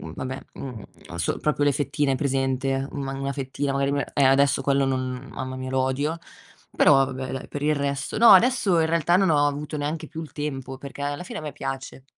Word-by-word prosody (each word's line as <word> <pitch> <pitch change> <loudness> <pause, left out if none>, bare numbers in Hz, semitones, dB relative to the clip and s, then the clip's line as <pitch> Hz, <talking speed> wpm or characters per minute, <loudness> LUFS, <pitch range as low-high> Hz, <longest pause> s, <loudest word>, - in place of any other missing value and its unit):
vabbè, 130 +1 -4
mhmm, 125 -6 -7 0.2
non 85 - -7
so, 85 - 0
proprio 150 -1 0
le 145 - +4
fettine, 145 0 0
hai 135 - 0
presente, 135 -1 0
una 140 -2 -4
ma 135 - -5
una 135 0 -2
fettina 140 0 -3
magari, 140 0 +1
eh, 140 - +3
adesso 135 +1 +4
quello 140 -1 +2
non 130 0 -3
mamma 130 0 -5
mia, 130 0 -5
lo 130 0 +1
odio. 140 +5 -1 0.6
Però - - +6
vabbè, 130 -1 -5
dai, 135 -1 -5
per 145 - -5
il 150 +1 +2
resto 140 +2 -2
no, 230 +1 +7
adesso 200 -3 +5
in 160 - +3
realtà 170 +1 +3
non 190 -1 +3
ho 145 -2 +4
avuto 145 +1 -2
neanche 155 +2 -3
più 160 +1 -7
il 160 - -9
tempo, 135 -3 -5
perché 140 +1 -8
alla 145 +3 -3
fine - - -7
a - - -8
me 150 -1 -5
piace. 135 -1 -6
140 Hz, 220 wpm, -24 LUFS, 135-150 Hz, 0.6 s, no